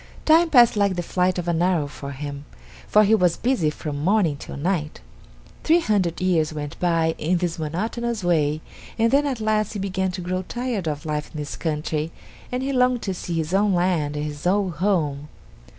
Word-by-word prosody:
Time 325 +2 +5
passed 240 -7 +6
like 200 -2 +2
the 175 - -2
flight 180 +1 0
of 175 -1 -3
an 170 -1 +1
arrow 175 -4 +2
for 140 -1 -8
him, 140 +1 -6 0.4
for 210 - +5
he 210 +1 +3
was 180 -6 +3
busy 240 -11 +1
from 150 -1 -5
morning 185 -4 +2
till 140 - -8
night. 155 -1 -2 0.6
Three 330 +2 +4
hundred 195 - 0
years 170 -4 +1
went 145 -1 -6
by 165 -2 +2
in 175 +4 +1
this 170 -1 -2
monotonous 215 +8 -3
way, 155 -3 +1 0.4
and 230 0 +3
then 285 +1 +3
at 260 -4 -2
last 215 -1 0
he - - -4
began 190 -1 -1
to 185 - -5
grow 185 +1 -2
tired 235 -2 -3
of 150 +1 -3
life 150 -1 -3
in 155 - -8
this 145 -4 -5
country, 155 +2 -2 0.4
and 250 +1 -2
he 275 +1 -1
longed 250 -1 +2
to 190 - -2
see 175 -1 -5
his 160 +1 -2
own 200 0 +3
land 175 -5 +1
and 150 0 -2
his 150 +2 -4
old 190 -3 +1
home. 150 -6 0
175 Hz, 200 wpm, -23 LUFS, 155-210 Hz, 0.6 s, passed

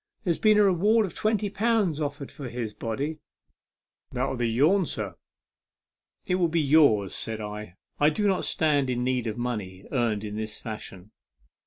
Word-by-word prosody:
There's 170 -3 0
been 215 -1 +5
a 210 - +6
reward 205 +4 +4
of 185 - -7
twenty 215 -1 0
pounds 200 -6 +1
offered 145 -1 -4
for 135 -4 -7
his 115 -3 -4
body. 135 +9 -3 0.9
That'll 130 +2 -1
be 120 -1 0
yourn, 155 - +3
sir." 105 - -3 0.6
" - - -52
It 180 - +1
will 170 - +4
be 165 +1 0
yours," 140 -10 +4
said 110 -1 -4
I. 105 -3 -7
" - - -45
I 145 - +5
do 205 +7 -1
not 190 -2 +1
stand 145 -4 +1
in 125 -1 -1
need 125 -2 0
of 110 +1 -3
money 105 -6 -4
earned 115 -6 0
in 105 0 -5
this 110 -1 -4
fashion." 105 -3 -8
135 Hz, 180 wpm, -26 LUFS, 110-170 Hz, 0.9 s, a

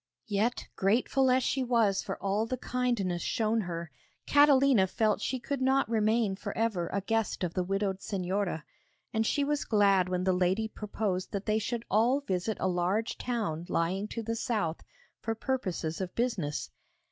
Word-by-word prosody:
Yet, 220 +2 -1
grateful 250 +6 +2
as 255 0 +3
she 265 +1 0
was 230 -6 +2
for - - -5
all 200 +3 +1
the 255 - -2
kindness 235 -9 -1
shown 225 -1 +1
her, 170 -4 -5 0.3
Catalina 275 -7 +5
felt 215 +2 +1
she 260 - -1
could 275 +2 -3
not 265 +1 +3
remain 220 -2 +2
for 195 - -6
ever 215 -7 0
a 200 - -2
guest 225 0 -1
of 175 -2 -1
the 185 - 0
widowed 195 +1 -1
Señora; 190 -4 -2 0.5
and 220 0 +1
she 285 - +1
was 295 0 0
glad 195 -4 +3
when 180 0 -1
the 185 0 +2
lady 185 +4 +1
proposed 205 -3 -3
that 200 0 -3
they 215 0 +2
should 230 +2 -3
all 235 +7 +3
visit 195 -3 -2
a - - +1
large 185 +5 0
town 200 -9 -2
lying 185 +5 0
to 230 +1 -5
the 230 +1 -2
south, 210 -8 -1 0.4
for 225 - -2
purposes 190 -10 -2
of 185 -1 -5
business. 210 -12 -1
215 Hz, 170 wpm, -30 LUFS, 185-235 Hz, 0.5 s, Catalina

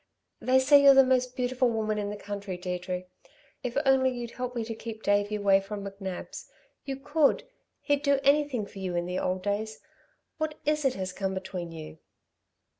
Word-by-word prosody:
They 255 +1 +3
say 280 +2 +6
you're 275 -1 +8
the 270 - +8
most 255 -1 +1
beautiful 250 0 +1
woman 215 -2 -1
in 205 -1 -2
the 205 - -4
country, 200 -2 -5
Deirdre. 180 0 -4 0.6
If 245 0 -4
only 265 -1 +4
you'd 240 -2 -5
help 250 0 -5
me 235 - -1
to 225 +1 -5
keep 220 0 -8
Davey 205 +1 +2
away 200 -1 +4
from 200 0 -6
McNab's! 195 -2 -7 0.4
You 270 - -3
could! 290 +2 +2 0.4
He'd 285 -1 +1
do 280 -2 +3
anything 280 -5 +2
for 200 - -11
you 185 -2 -3
in 175 0 0
the 180 +1 -2
old 185 0 -1
days. 215 +2 -2 0.6
What 310 -1 -2
is 300 -1 +1
it 265 - +2
has 185 -1 -4
come 190 0 -2
between 185 -2 -5
you?" 160 -1 -9
220 Hz, 190 wpm, -28 LUFS, 195-260 Hz, 0.6 s, you're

